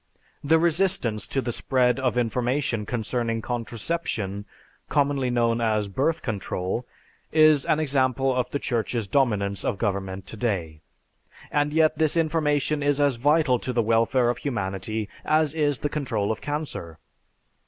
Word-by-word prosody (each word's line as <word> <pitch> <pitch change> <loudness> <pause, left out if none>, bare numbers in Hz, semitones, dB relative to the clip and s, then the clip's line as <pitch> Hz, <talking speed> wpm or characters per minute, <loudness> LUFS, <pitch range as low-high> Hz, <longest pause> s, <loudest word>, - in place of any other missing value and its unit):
The 160 +3 +4
resistance 165 - +1
to 135 - -1
the 120 - -2
spread 125 +1 +1
of 125 -2 0
information 125 -1 0
concerning 115 -1 -1
contraception, 115 - -3 0.4
commonly 140 -3 +1
known 120 -1 +1
as 110 -2 +1
birth 140 +11 -1
control, 105 0 -3 0.4
is 155 -3 +5
an 155 - +2
example 135 -3 +1
of 125 -1 0
the 145 - -1
Church's 120 -3 -2
dominance 100 -5 0
of - - -1
government 95 -2 -2
today; 95 -9 -3 0.7
and 145 0 +1
yet 155 0 +3
this 155 +1 +2
information 155 -2 +1
is 145 0 +2
as 140 -4 +2
vital 145 -1 +3
to 130 - -3
the 120 -2 +1
welfare 115 +2 +2
of 120 - -6
humanity 105 -3 -3 0.2
as 155 -1 +2
is 145 -3 +1
the 145 - -2
control 130 -9 -1
of 110 - -4
cancer. 145 - -5
125 Hz, 145 wpm, -25 LUFS, 110-145 Hz, 0.7 s, is